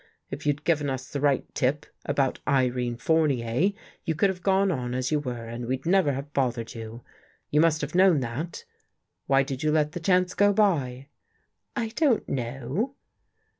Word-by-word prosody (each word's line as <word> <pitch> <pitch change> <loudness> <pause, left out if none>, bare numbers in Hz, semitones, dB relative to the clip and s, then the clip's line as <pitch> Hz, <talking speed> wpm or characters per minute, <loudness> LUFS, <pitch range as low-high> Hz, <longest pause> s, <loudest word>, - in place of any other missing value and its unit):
If 145 +2 -5
you'd 145 0 0
given 150 -4 +1
us 130 -1 -4
the 140 - -3
right 145 -2 +2
tip 145 +3 0 0.2
about 140 -2 0
Irene 125 -3 +1
Fournier, 145 - +2 0.3
you 165 -3 -1
could 195 +5 +3
have 180 -1 -9
gone 195 +1 +3
on 125 -5 -2
as 130 +2 -1
you 150 - +2
were 125 -5 -5
and 120 +1 -6
we'd 130 +3 -2
never 175 -5 +3
have 140 +2 -6
bothered 120 -4 -1
you. 115 +1 -8 0.5
You 150 - +4
must 160 -1 +3
have 145 0 -4
known 185 -3 +5
that. 135 +8 -5 0.6
Why 135 0 +4
did 135 -1 -5
you 155 - +2
let 150 -1 +2
the 175 - -5
chance 180 +1 +2
go 205 0 +4
by? 140 -11 +1 0.2
" - - -44
" - - -55
I 235 -3 -1
don't 260 -1 +1
know." 135 - -3
145 Hz, 185 wpm, -26 LUFS, 125-170 Hz, 0.6 s, known